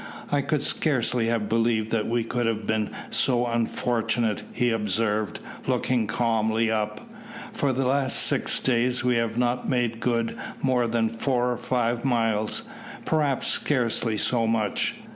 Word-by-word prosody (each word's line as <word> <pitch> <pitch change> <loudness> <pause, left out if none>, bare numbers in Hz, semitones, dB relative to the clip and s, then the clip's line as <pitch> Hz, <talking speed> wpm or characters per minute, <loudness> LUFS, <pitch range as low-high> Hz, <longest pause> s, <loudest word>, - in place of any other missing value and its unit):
"I 145 - +3
could 145 0 0
scarcely 125 -7 +1
have 115 -2 0
believed 115 0 +1
that 110 -2 0
we 120 0 +1
could 120 +1 -1
have 110 -1 -1
been 110 -1 0 0.2
so 125 -2 +2
unfortunate," 115 -1 0
he 120 0 +1
observed, 105 0 0 0.3
looking 120 -4 +1
calmly 110 0 +1
up. 105 -1 -2 0.5
"For 140 - +1
the 130 +1 0
last 135 +1 +1
six - - +1
days 125 0 +1
we 125 -1 +2
have 115 -1 -1
not 125 0 0
made 120 -3 0
good 115 -1 0 0.2
more 125 -3 +2
than 115 -1 +1
four 125 +2 0
or 120 - -2
five 120 -1 -1
miles 115 -5 0 0.4
perhaps 150 -4 +1
scarcely 120 -5 0
so 115 +1 +1
much. 110 -2 0
115 Hz, 145 wpm, -25 LUFS, 110-125 Hz, 0.5 s, I